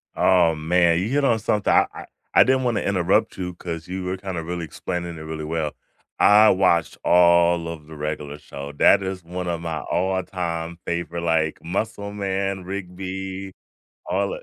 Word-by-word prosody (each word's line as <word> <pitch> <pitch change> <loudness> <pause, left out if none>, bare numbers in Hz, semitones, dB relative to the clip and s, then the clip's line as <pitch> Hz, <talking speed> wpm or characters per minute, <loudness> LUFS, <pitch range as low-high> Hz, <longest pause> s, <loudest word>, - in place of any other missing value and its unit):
Oh, 85 -3 +4
man 85 +2 +2
you 95 +5 -2
hit 140 +2 +1
on 115 -4 +3
something, 105 -1 +1
I - - +5
I - - -9 0.3
I - - +9
didn't 130 0 +2
wanna 120 -3 0
interrupt 95 -2 +1
you 90 -1 -4
'cause 85 -1 -6
you 95 0 -4
were 90 +1 -3
kinda 95 -3 -5
really 85 +1 -4
explaining 85 +2 -5
it 80 - -8
really 80 0 -6
well. 80 -1 -2 0.5
I 105 +1 +7
watched 90 -3 +2
all 85 -1 +4
of 80 -2 -8
the 80 - -10
Regular 75 -1 -4
Show, 70 -1 -9
that 100 +7 +5
is 95 -1 -4
one 90 +1 -5
of 85 -1 -2
my 80 -2 -3
all 95 +1 0
time 85 -2 -4
favorite, 85 0 -3
like, 80 -2 +1
Muscle 100 +3 -3
Man, 95 -1 -2
Rigby, 95 0 -6 0.5
all 100 +1 0
o - - -7
90 Hz, 180 wpm, -23 LUFS, 85-95 Hz, 0.5 s, I